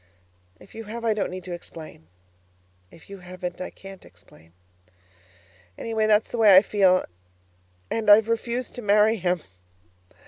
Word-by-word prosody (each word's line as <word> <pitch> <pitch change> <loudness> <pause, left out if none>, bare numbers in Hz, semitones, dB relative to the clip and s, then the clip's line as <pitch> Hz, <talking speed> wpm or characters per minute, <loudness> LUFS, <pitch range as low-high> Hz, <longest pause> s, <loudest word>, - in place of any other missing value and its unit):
If - - -18
you 225 0 -9
have, 230 +2 -7
I 225 - +2
don't 210 -2 -2
need 185 0 -8
to 180 - -9
explain; 160 - -11 0.8
if 165 - -18
you 200 -1 -10
haven't, 180 0 -8
I 185 - -5
can't 195 -1 -13
explain. 80 +1 -21 1.3
Anyway, 220 -1 -1
that's 215 0 +2
the 240 - -4
way 210 -4 +7
I 190 - +8
feel 190 -4 +2 0.9
and 220 -2 -1
I've 210 +1 +7
refused 235 +2 -3
to 245 - -7
marry 210 +1 +3
him. 180 -2 -1
205 Hz, 150 wpm, -24 LUFS, 185-220 Hz, 1.3 s, I